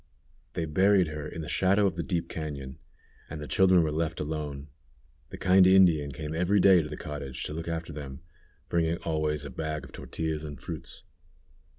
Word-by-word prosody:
They 80 - -2
buried 95 +2 +3
her 75 0 -5
in 80 - -6
the 75 - -6
shadow 100 +2 +3
of 95 -5 +1
the 85 - -2
deep 85 -2 -2
cañon, 70 -5 -6 0.5
and 80 - -6
the 75 - -6
children 95 -2 +4
were 80 - 0
left 80 +1 -2
alone. 75 -2 -4 0.6
The - - -8
kind 95 0 +5
Indian 90 -6 +5
came 75 +3 -6
every 90 +5 +2
day 95 -2 +6
to 75 - -6
the 75 - -6
cottage 70 -3 -6
to - - -4
look 80 +1 -5
after 85 -1 -4
them, 70 -1 -8 0.5
bringing 85 0 +1
always 75 -2 -1
a 70 - -7
bag 75 +2 -4
of - - -11
tortillas 80 -1 -4
and 75 -4 -7
fruits. - - -7
80 Hz, 190 wpm, -28 LUFS, 75-85 Hz, 0.6 s, day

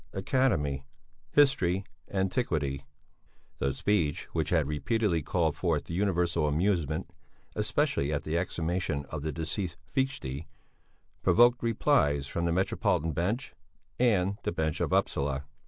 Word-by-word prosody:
Academy. 95 - +1 0.5
History. 100 -10 +3 0.2
Antiquity. 80 - -1 0.7
The 70 - +1
speech 80 +1 0
which 80 -2 0
had 80 -4 +3
repeatedly 85 +5 0
called 80 -1 0
forth 85 -3 -1
universal 85 -4 +1
amusement 80 0 0 0.4
especially 70 +2 +1
at 75 - -1
the 80 - -2
exhumation 85 -3 -1
of 80 - -4
the 80 +1 -2
deceased 80 +3 -3
Fichte, 85 - -2 0.7
provoked 120 +1 +5
replies 110 - +2
from 85 +4 -2
the 85 - +1
Metropolitan 85 -3 +1
Bench 95 - -2 0.5
and 100 -5 +2
the - - -1
bench 80 -2 -1
of - - 0
Upsala. 70 0 +1
85 Hz, 120 wpm, -29 LUFS, 75-100 Hz, 0.7 s, provoked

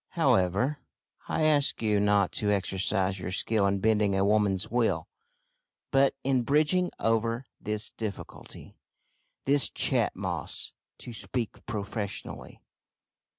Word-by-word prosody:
However, 100 +11 +2 0.5
I 155 - -1
ask 150 -2 +2
you 105 -2 +1
not 100 -2 +2
to 105 - -1
exercise 95 0 0
your 90 - -5
skill 100 +2 +1
in 100 0 +1
bending 105 -1 +2
a 95 0 +2
woman's 100 -3 +1
will, 120 -1 0 0.8
but 135 0 +3
in 130 -1 +2
bridging 155 +8 +2
over 115 +2 0
this 105 0 -1
difficulty 105 -4 -8 0.7
this 140 +1 +6
Chat - - +2
Moss, - - -4 0.3
to 120 - -9
speak 115 0 -3
professionally." 105 -2 -5
110 Hz, 115 wpm, -28 LUFS, 100-125 Hz, 0.8 s, this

